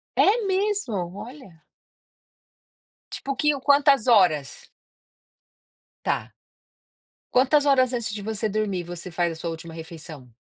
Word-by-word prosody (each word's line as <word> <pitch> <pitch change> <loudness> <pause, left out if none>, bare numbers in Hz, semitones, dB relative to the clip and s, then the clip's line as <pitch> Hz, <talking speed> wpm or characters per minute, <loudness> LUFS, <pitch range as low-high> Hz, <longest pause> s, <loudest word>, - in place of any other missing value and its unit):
É 435 +1 +3
mesmo? 390 - 0 0.2
Olha. 225 - -11 1.5
Tipo 275 - -5
o - - -2
que 300 -1 +2
quantas 280 -3 +4
horas? 175 - +2 1.4
Tá. - - -2 1.0
Quantas 275 +3 +4
horas 260 -3 +4
antes 235 -3 -2
de 205 - -5
você 220 +1 -2
dormir 205 -3 -2
você 175 +1 -7
faz 175 0 -1
a - - -6
sua 170 +1 -5
última 165 0 -8
refeição? 160 -5 -10
215 Hz, 120 wpm, -24 LUFS, 170-275 Hz, 1.5 s, quantas